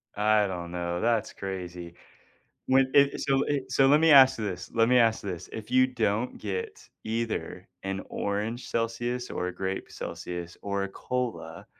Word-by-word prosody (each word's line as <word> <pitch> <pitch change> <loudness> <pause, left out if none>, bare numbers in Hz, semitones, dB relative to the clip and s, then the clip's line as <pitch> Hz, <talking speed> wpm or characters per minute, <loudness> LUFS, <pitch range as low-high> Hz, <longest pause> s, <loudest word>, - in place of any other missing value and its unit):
I 105 0 +3
don't 90 -2 -5
know, 85 0 -3
that's 115 -2 +1
crazy. 90 -3 -6 0.7
When 130 0 +4
it 140 0 +4
so 135 0 +2
it 135 -3 -2
so 135 +2 +4
let 145 +2 +5
me 165 0 +5
ask 130 -1 +8
this, 100 -5 -5
let 115 0 +3
me 125 0 +5
ask 115 -2 +3
this. 90 -3 -6
If 110 -1 -7
you 130 0 +5
don't 115 -2 -1
get 95 -3 -5 0.2
either 115 0 -3 0.2
an 95 0 -3
orange 105 +4 -3
Celsius 120 +2 -2
or 90 - -2
a 90 - -6
grape 95 0 -4
Celsius 85 -1 -6
or 100 -1 -1
a - - -4
cola 125 +4 -4
110 Hz, 170 wpm, -27 LUFS, 95-125 Hz, 0.7 s, ask